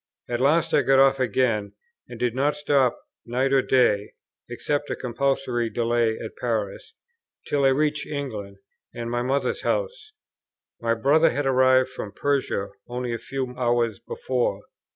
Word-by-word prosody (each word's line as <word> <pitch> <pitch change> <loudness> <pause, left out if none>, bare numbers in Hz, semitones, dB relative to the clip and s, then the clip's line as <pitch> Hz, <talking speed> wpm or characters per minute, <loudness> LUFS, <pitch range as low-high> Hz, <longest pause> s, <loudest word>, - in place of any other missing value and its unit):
At 120 0 -2
last 165 +4 +2
I - - +5
got 135 0 +3
off 135 0 +5
again, 115 -4 0 0.4
and - - -9
did 120 -2 0
not 140 +4 +1
stop 140 -4 +1 0.2
night 130 +3 0
or 135 - +5
day, 105 -7 +2 0.4
(except 145 0 -2
a - - -1
compulsory 125 -1 -1
delay 115 0 +1
at 110 - -8
Paris,) 115 - -3 0.5
till 140 -1 +1
I - - +7
reached 150 +2 +1
England, 110 -9 -5 0.4
and 120 0 -4
my 120 0 0
mother's 135 +3 -1
house. 480 -3 -2 0.7
My 115 0 +1
brother 145 +8 +4
had 145 +3 -2
arrived 130 0 +4
from 110 -6 -7
Persia 135 -8 -1 0.2
only 125 0 -3
a 115 - -3
few 130 -2 -4
hours 120 -3 0
before. 115 -3 -2
130 Hz, 150 wpm, -24 LUFS, 115-140 Hz, 0.7 s, I